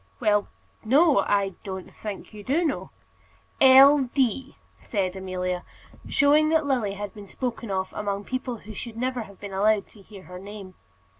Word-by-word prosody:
"Well, 210 -1 +2 0.4
no. 285 +7 +5
I 200 -1 +1
don't 190 -2 -7
think 210 0 -7
you 210 -1 -10
do 305 - +1
know." 295 - -2 0.7
"L. 270 0 +8
D.!" 265 0 0 0.2
said 190 -4 -2
Amelia, 185 -1 -3 0.5
showing 300 +1 +4
that 320 -1 +2
Lily 245 -8 0
had 205 0 -6
been 205 -2 -11
spoken 235 0 -4
of 190 -1 -2
among 200 -1 -3
people 255 +1 -4
who 215 - -8
should 225 +2 -7
never 255 0 -1
have 200 -3 -11
been 200 -1 -8
allowed 205 +1 +2
to 210 - -17
hear 195 -1 -13
her 180 0 -10
name. 200 -1 -10
210 Hz, 165 wpm, -25 LUFS, 195-260 Hz, 0.7 s, L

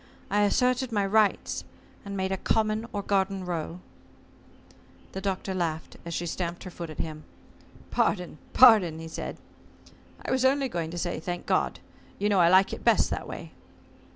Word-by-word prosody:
I 205 +1 +3
asserted 250 +4 +2
my 205 -3 +1
rights, 210 0 +2 0.4
and 200 -1 -5
made 190 0 -1
a 190 - 0
common 215 +2 0
or 205 -1 -3
garden 195 -1 0
row." 170 0 -4 1.3
The 190 - -5
Doctor 190 0 -2
laughed, 165 -3 -3
as 170 - -3
she 175 - -2
stamped 170 0 -4
her 185 - -8
foot 170 -1 -7
at 155 - -9
him. 155 -1 -4 0.7
"Pardon 180 -5 0
pardon," 180 -10 +6
said 160 - -5 0.5
he. - - -20 0.3
"I - - -2
was 260 0 +2
only 270 0 +3
going 170 -6 -3
to 175 - -6
say 175 -2 -2
'Thank 175 +2 -5
God.' - - 0 0.4
You 205 - 0
know 200 -2 +3
I 170 -1 +6
like 190 +2 +5
it - - -7
best - - +3
that - - -3
way." - - -8
190 Hz, 175 wpm, -27 LUFS, 170-210 Hz, 1.3 s, pardon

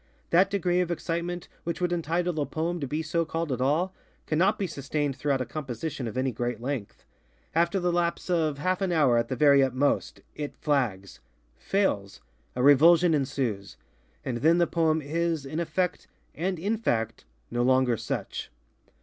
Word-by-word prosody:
That 180 +3 +5
degree 180 -2 +1
of 180 - -1
excitement 170 0 -3 0.2
which 170 - -3
would 180 -1 0
entitle 170 0 -1
a 145 - +1
poem 170 +2 -2
to 140 - -3
be 150 +4 -2
so 165 +1 0
called 165 -1 -3
at 125 -1 -2
all, 160 +8 +1 0.3
cannot 185 +7 +2
be 200 - -1
sustained 145 -3 -2
throughout 140 -1 0
a - - -1
composition 140 -1 -5
of 115 - -6
any 130 0 +1
great 120 0 -3
length. 125 -4 -5 0.5
After 170 +4 +2
the 180 -1 +1
lapse 170 0 -1
of 160 -5 +1
half 185 +6 -1
an 190 -2 0
hour, 140 -8 +4
at 115 - -1
the 130 - -2
very 140 +1 +5
utmost, 135 +2 0
it 145 -1 -6
flagsŌĆöfailsŌĆöa 100 - -2 0.4
revulsion 160 +6 +6
ensuesŌĆöand 120 -2 -4
then 165 +4 +5
the 175 - +4
poem 160 -2 +1
is, 165 0 -1
in 155 +4 -4
effect, 170 +2 -1 0.3
and 180 +3 -2
in 205 +7 -1
fact, 115 - -1 0.3
no 120 - 0
longer 130 -1 +3
such. - - -4
155 Hz, 165 wpm, -27 LUFS, 130-170 Hz, 0.5 s, revulsion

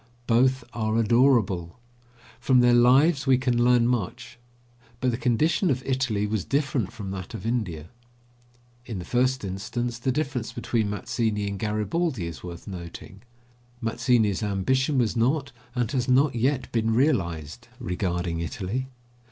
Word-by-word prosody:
Both 130 +2 +3
are 110 -1 -1
adorable; 115 -6 +2 0.6
from 125 +1 +3
their 120 0 +5
lives 135 +5 +4
we 130 -1 +5
can 125 -2 +1
learn 120 -1 +4
much. 120 +1 -3 0.6
But 125 0 +1
the - - -1
condition 150 - +1
of 130 -2 0
Italy 130 -6 0
was 105 -2 -1
different 135 -7 -1
from 100 -3 -7
that 95 +2 -6
of 110 - -7
India. 90 -10 -2 1.0
In 110 - -4
the 90 - -6
first 130 -1 +1
instance 120 +6 -4
the 130 +2 0
difference 135 -4 -2
between 110 -4 -1
Mazzini 105 +1 -1
and 100 -1 -4
Garibaldi 110 - -1
is 85 -1 -7
worth 85 -1 -8
noting. 90 +1 -9 0.6
Mazzini's 115 -3 +1
ambition 130 +8 0
was 120 -3 +1
not, 135 +5 +1 0.2
and 120 -3 0
has 130 -3 -1
not 135 +2 +4
yet 130 +3 0
been 115 -1 +1
realised, 95 - 0
regarding 90 -6 -2
Italy. 100 +9 -3
120 Hz, 145 wpm, -25 LUFS, 100-130 Hz, 1.0 s, their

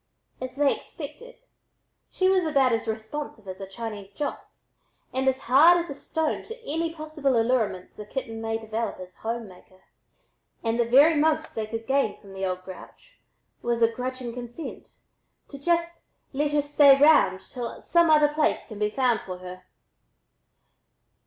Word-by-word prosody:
As 255 0 -5
they 285 0 +3
expected, - - -10 0.7
she 370 - +1
was 375 -1 +3
about 275 -6 +3
as 225 0 -1
responsive 220 0 -5
as 185 +1 -7
a 195 - -6
Chinese 205 -1 -7
Joss 290 - -6 0.4
and 265 +1 0
as 265 0 +2
hard 305 +8 +6
as 340 -3 -3
a - - -3
stone 315 +2 -2
to 455 +2 -9
any 325 +3 -1
possible 305 -5 -1
allurements 225 -6 0
the 210 - -7
kitten 225 -3 -5
might 225 0 -2
develop 220 -1 -3
as 185 0 -10
a - - -25
home 230 0 -3
maker, 185 0 -18 0.8
and 230 +1 0
the 235 - +3
very 285 +7 +7
most 310 +1 +1
they 220 -1 -3
could 225 +1 -5
gain 270 -4 +1
from 195 -2 -14
the 190 0 -6
"old 185 -1 -2
grouch" 190 - -13 0.4
was 235 -1 0
a 230 - +4
grudging 250 0 -5
consent 245 +5 -9 0.5
to 280 - -9
just 340 +2 -1 0.3
"let 290 +2 0
her 295 -1 +2
stay 285 -1 +6
round 275 -11 +5
till 240 +4 -7
some 340 -1 +3
other 300 -1 +5
place 300 -3 0
can 215 -2 -8
be 210 0 +1
found 245 -1 +1
for 185 -1 -7
her." 180 0 -10
250 Hz, 170 wpm, -26 LUFS, 220-300 Hz, 0.8 s, very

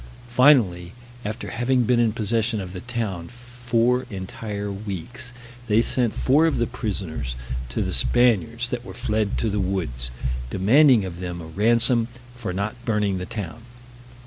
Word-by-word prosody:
Finally, 120 -9 +4 0.3
after 110 +3 -5
having 120 +2 +2
been 120 +1 +3
in 115 -2 +3
possession 110 +1 0
of 90 -2 -6
the 90 - -5
town 110 -7 -3
four 120 0 0
entire 100 +1 -5
weeks, 105 +5 -6 0.4
they 105 +1 +4
sent 120 -1 +1
four 150 +5 +4
of 160 - 0
the 120 - +2
prisoners 90 - -4 0.3
to - - -1
the - - -1
Spaniards 115 - +2
that 120 -1 -3
were 95 -5 -9
fled 110 -3 0
to 115 - 0
the 105 -1 0
woods, 85 -11 -2 0.4
demanding 115 - +5
of 85 -2 -7
them 90 -1 -4
a 85 - -8
ransom 115 +6 +3 0.3
for 120 -6 -4
not 100 +3 -2
burning 105 -4 0
the 90 - -5
town. 110 -1 -6
110 Hz, 155 wpm, -24 LUFS, 95-120 Hz, 0.4 s, demanding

